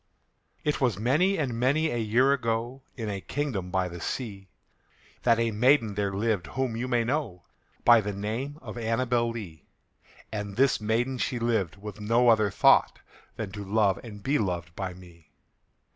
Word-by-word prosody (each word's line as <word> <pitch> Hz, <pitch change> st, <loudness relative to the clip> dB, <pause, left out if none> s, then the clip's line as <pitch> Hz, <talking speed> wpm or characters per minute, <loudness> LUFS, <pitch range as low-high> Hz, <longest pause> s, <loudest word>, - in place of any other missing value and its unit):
It 150 Hz, -1 st, -1 dB
was 120 Hz, -7 st, +2 dB
many 155 Hz, -, +2 dB
and 135 Hz, -6 st, -1 dB
many 145 Hz, +6 st, +2 dB
a 120 Hz, -, -1 dB
year 120 Hz, +5 st, +3 dB
ago, 120 Hz, 0 st, -2 dB, 0.2 s
In 115 Hz, -3 st, -4 dB
a 100 Hz, -2 st, -3 dB
kingdom 120 Hz, -8 st, -3 dB
by 95 Hz, 0 st, 0 dB
the 85 Hz, -1 st, -8 dB
sea, 100 Hz, -5 st, -5 dB, 0.7 s
That 115 Hz, -2 st, +4 dB
a 115 Hz, -1 st, +1 dB
maiden 115 Hz, 0 st, +3 dB
there 100 Hz, -1 st, -1 dB
lived 100 Hz, -2 st, -1 dB
whom 130 Hz, -2 st, -2 dB
you 120 Hz, +2 st, -3 dB
may 120 Hz, -2 st, +2 dB
know 120 Hz, -, -2 dB, 0.4 s
By 120 Hz, -2 st, +7 dB
the 105 Hz, 0 st, -3 dB
name 110 Hz, +9 st, -4 dB
of 115 Hz, 0 st, -7 dB
ANNABEL 120 Hz, +1 st, +1 dB
LEE; 95 Hz, -11 st, -8 dB, 0.6 s
And 105 Hz, -2 st, -4 dB
this 135 Hz, -3 st, +3 dB
maiden 120 Hz, +4 st, 0 dB
she 125 Hz, +2 st, -1 dB
lived 115 Hz, -7 st, 0 dB
with 105 Hz, +1 st, -9 dB
no 115 Hz, +3 st, +3 dB
other 110 Hz, -3 st, +4 dB
thought 95 Hz, -, +4 dB, 0.4 s
Than 105 Hz, -4 st, -5 dB
to 105 Hz, +1 st, -6 dB
love 100 Hz, -1 st, +2 dB
and 105 Hz, -4 st, -10 dB
be 140 Hz, +2 st, +1 dB
loved 90 Hz, -4 st, -3 dB
by 95 Hz, -2 st, -4 dB
me. 85 Hz, -3 st, -16 dB
115 Hz, 175 wpm, -27 LUFS, 100-125 Hz, 0.7 s, By